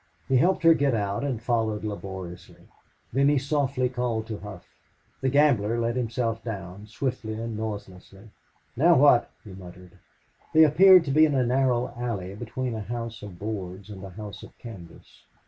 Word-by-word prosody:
He 135 - +3
helped 180 +6 +2
her 165 0 +8
get 140 -5 +1
out, 100 +2 -2
and 135 -5 -2
followed 110 -2 -1
laboriously. 95 -4 -8 0.5
Then 140 +2 +3
he 145 - +3
softly 135 -2 0
called 120 -3 -2
to 110 - -5
Hough. 100 -3 -10 0.5
The 135 - +1
gambler 125 -6 +3
let 115 +1 -1
himself 115 -2 -2
down 100 -2 -7
swiftly 120 -1 -4
and 115 0 -5
noiselessly. 100 -1 -8 0.4
"Now 165 +6 +5
what?" 130 -3 +5
he 105 - -11
muttered. 90 -1 -13 0.6
They 160 - +8
appeared 180 +3 +7
to 140 - -2
be 155 +3 +6
in 145 - -1
a 130 -2 +2
narrow 125 -1 +1
alley 110 -6 -4
between 120 +3 -4
a 110 - -4
house 115 +1 -6
of 100 -4 -9
boards 100 -1 -6
and 95 -2 -9
a 95 - -7
house 105 +2 -9
of - - -14
canvas. 95 -8 -12
115 Hz, 170 wpm, -26 LUFS, 100-130 Hz, 0.6 s, her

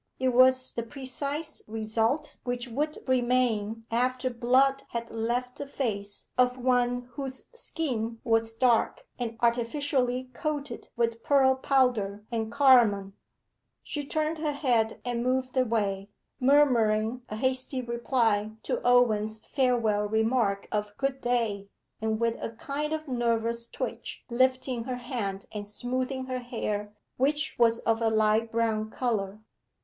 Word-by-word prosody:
It 260 0 +1
was 255 +1 +4
the 235 - -2
precise 280 +5 -5
result 225 +7 -1
which 245 0 -3
would 295 +6 -2
remain 240 -4 +1
after 255 +2 +1
blood 260 +3 +3
had 235 0 -4
left 240 +3 -2
the 285 - -4
face 205 -8 -3
of 250 0 +4
one 245 -1 +1
whose 265 +1 -6
skin 235 - -3
was 225 0 +1
dark, 245 - +2
and 230 -2 -3
artificially 250 +1 0
coated 295 -2 -4
with 230 -1 0
pearl 270 -1 +4
powder 250 -7 +1
and 225 -1 -2
carmine. 235 -8 +5 0.7
She 295 - -4
turned 310 +2 -1
her 305 -2 -1
head 240 -6 +1
and 240 -1 -1
moved 255 +1 0
away, 210 -6 0 0.3
murmuring 250 -4 +3
a 215 - -4
hasty 260 +3 -1
reply 235 -3 +1
to - - -2
Owen's 220 -3 +3
farewell 225 -5 +1
remark 220 -2 +1
of 210 -1 -2
'Good 270 -1 -1
day,' 225 -5 0 0.3
and 220 0 0
with 230 0 +1
a - - -2
kind 280 +6 -4
of 315 0 -3
nervous 235 -2 0
twitch - - -5
lifting 255 -1 +1
her 255 -1 -2
hand 230 -6 -4
and 205 -1 -6
smoothing 255 +4 -3
her 255 -1 -3
hair, 210 -4 -3 0.3
which 295 +4 +1
was 230 -1 +5
of 225 0 +1
a 225 - +3
light 220 +1 +2
brown 220 -2 0
colour. 215 -4 -2
240 Hz, 135 wpm, -28 LUFS, 225-260 Hz, 0.7 s, carmine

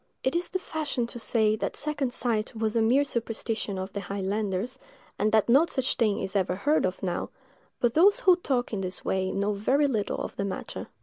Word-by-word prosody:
It 260 - +1
is 345 +1 0
the 370 - -1
fashion 305 -8 -2
to 240 +1 -8
say 220 -2 +2
that - - -3
second 290 -3 -1
sight 230 -3 0
was 220 0 -1
a 230 - +3
mere 250 +6 +4
superstition 225 -4 -2
of 190 +1 -5
the 200 - -3
highlanders, 200 +5 -2 0.4
and 215 +1 +2
that 220 -1 +3
no 275 +8 +5
such 265 -3 0
thing 215 -4 +1
is 190 - -4
ever 185 -2 +1
heard 290 +3 +2
of 185 - -6
now; 180 -2 -2 0.5
but 240 -1 +2
those 390 +6 +5
who 365 -1 +6
talk 260 -9 -1
in 200 - -1
this 185 0 -5
way 190 0 0
know 200 +1 0
very 260 +9 +2
little 220 -7 -1
of - - -5
the 200 - -1
matter. 195 - -5
225 Hz, 210 wpm, -27 LUFS, 200-265 Hz, 0.5 s, who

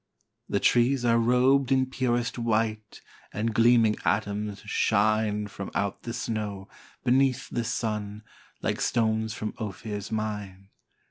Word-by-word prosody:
The - - +1
trees 125 +1 +3
are 115 0 +4
rob'd 125 +3 +3
in 130 -1 +4
purest 120 -2 -1
white, 110 -2 -1 0.3
And 110 +2 -2
gleaming 115 -1 +4
atoms 100 -1 -1
shine 105 0 +1
From 100 -1 -7
out 100 -1 -1
the 115 - -5
snow, 105 -5 -4 0.4
beneath 130 0 +2
the 120 - -1
sun, 105 -2 -3 0.4
Like - - -1
stones 110 -1 0
from 110 - -4
Ophir's 105 0 -5
mine. 105 -3 -4
110 Hz, 125 wpm, -27 LUFS, 105-120 Hz, 0.4 s, are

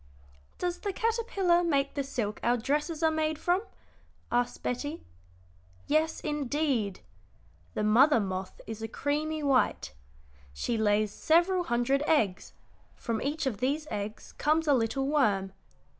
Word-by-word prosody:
"Does 355 -1 -2
the 405 - -2
caterpillar 395 -6 +1
make 280 -5 +1
the 280 - -1
silk 230 -6 -3
our 240 +1 +2
dresses 300 +6 -1
are 320 - +4
made 315 -1 0
from?" 355 +4 +1 0.7
asked 245 0 0
Betty. 290 +6 -3 0.8
"Yes, 315 +2 +1
indeed. 285 - -1 0.7
The - - 0
mother 240 +6 +5
moth 190 -2 -4
is 225 0 -7
a 225 - -3
creamy 300 +5 -2
white. 270 - +1 0.6
She 230 - -2
lays 210 -1 +2
several 350 +3 +3
hundred 245 +2 +1
eggs; 215 -13 +1 0.4
from 230 -2 -3
each 295 +2 -2
of 240 -7 -2
these 285 +5 0
eggs 210 +1 -5
comes 310 +2 +2
a 290 - +5
little 255 +2 +1
worm. 205 -10 +1
280 Hz, 135 wpm, -29 LUFS, 225-315 Hz, 0.8 s, mother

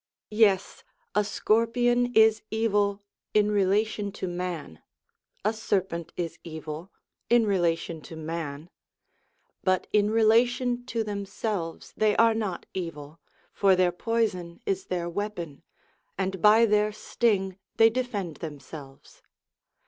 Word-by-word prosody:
Yes, 210 -3 +2 0.3
a 210 - +3
scorpion 240 +4 +2
is 220 0 +6
evil 205 -2 +1 0.3
in 210 0 +4
relation 205 +1 +1
to 190 - -4
man; 175 - -5 0.6
a 215 - +2
serpent 190 -6 -2
is 165 -1 -4
evil, 160 +2 -7 0.4
in 235 -1 +5
rela 175 -5 +2
tion 165 -1 -7
to 165 - -8
man; 160 0 -5 0.9
but 185 -1 +2
in 210 0 +4
relation 240 +3 +2
to 230 -2 -1
themselves 200 -3 -4
they 215 -1 +2
are 230 0 +5
not 210 -5 -3
evil, 165 -4 -6 0.3
for 195 -2 +4
their 180 -1 +3
poison 185 -4 -2
is 195 -1 -1
their 175 -2 -2
weapon, 175 -5 -5 0.6
and 190 -1 -2
by 215 +2 +7
their 210 -1 +2
sting 200 -3 0 0.2
they 225 0 +6
defend 215 -9 -3
themselves. 145 -2 -10
200 Hz, 120 wpm, -27 LUFS, 170-220 Hz, 0.9 s, by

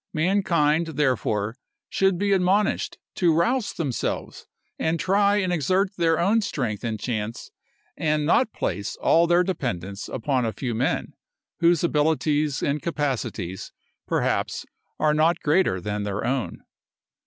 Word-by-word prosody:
Mankind, 165 -2 +2
therefore, 115 -6 0 0.3
should 195 -2 +1
be 200 +2 0
admonished 195 +2 +1 0.2
to 175 -3 +2
rouse 195 +7 +1
themselves, 145 -8 -3 0.3
and 160 +1 0
try 200 +3 +3
and 185 -3 +1
exert 185 +5 +1
their 165 -3 +2
own 210 +6 +3
strength 125 - -3
and 110 -2 -2
chance, 110 -1 -4 0.4
and 150 -1 0
not 225 - +3
place 100 +3 -3
all 170 +1 +3
their 175 +1 +4
dependence 100 - -4
upon 130 +1 -1
a 110 -1 -1
few 120 +3 -3
men, 120 +4 -1 0.5
whose 170 -1 +3
abilities 150 -2 +1
and 145 +1 0
capacities, 135 - -3 0.4
perhaps, - - -1 0.3
are 155 -1 +3
not 160 +3 +3
greater 150 - +2
than 105 +3 -3
their 100 0 -3
own. 130 0 -2
155 Hz, 130 wpm, -24 LUFS, 120-180 Hz, 0.5 s, their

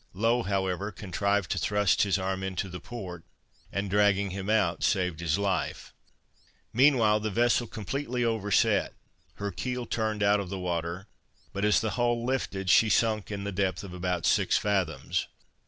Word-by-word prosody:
Low, 115 +4 +2
however, 95 0 -1
contrived 100 0 -1
to 95 - 0
thrust 105 +1 +2
his 100 -1 +2
arm 95 0 -2
into 95 0 -3
the 90 0 -7
port, 90 -8 -8 0.5
and 100 +1 -2
dragging 100 0 +2
him 95 +1 -5
out, 105 -6 +2
saved 90 -5 +1
his 85 0 0
life. 100 -4 -2 0.8
Meanwhile, 120 -5 +4
the 110 0 -2
vessel 120 +2 +2
completely 125 +3 -3
overset. 105 -4 +1 0.4
Her 100 0 -4
keel 125 +1 -3
turned 110 -3 -1
out 100 +1 +4
of 100 -3 -5
the 95 - -4
water; 85 0 -3 0.5
but 100 - -3
as 105 -1 +4
the 110 -1 -1
hull 120 -1 0
filled, 95 -5 -2
she 110 - +6
sunk, 110 -3 +1
in 100 -1 -4
the 100 - -3
depth 95 -1 -1
of 95 -3 -8
about 90 -1 -2
six - - +3
fathoms. 95 -7 -1
100 Hz, 165 wpm, -28 LUFS, 95-110 Hz, 0.8 s, she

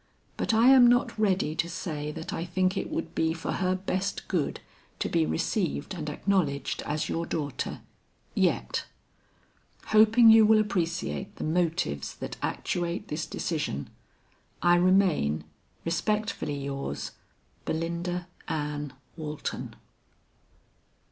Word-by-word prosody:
But - - 0
I 225 +3 +6
am 260 -2 +8
not 245 -1 +3
ready 190 -7 +2
to 165 +1 -1
say 150 -4 -4
that 160 +1 -6
I 165 - -2
think 185 +2 +1
it - - -2
would - - -3
be 160 0 +1
for 165 0 -4
her 185 0 +1
best 190 +1 -2
good 175 -6 -1 0.4
to - - -1
be 80 - +2
received 70 -2 -1
and 155 -4 -4
acknowledged 150 -4 0
as 150 +1 -1
your 165 0 -2
daughter 145 -5 -3 0.5
yet. - - +1 1.0
Hoping 220 +2 +7
you 220 0 +8
will 220 +1 +6
appreciate 185 -1 -1
the - - -6
motives 160 - 0
that - - -6
actuate 175 +3 -2
this 155 +1 -3
decision, 150 - -3 0.7
"I 175 0 +6
remain, 175 - +3 0.4
respectfully 210 -3 -1
yours, 140 0 -4 0.5
"BELINDA 170 +2 -2 0.2
ANN 150 -3 -3 0.2
WALTON." 150 -2 -5
170 Hz, 120 wpm, -28 LUFS, 150-195 Hz, 1.0 s, am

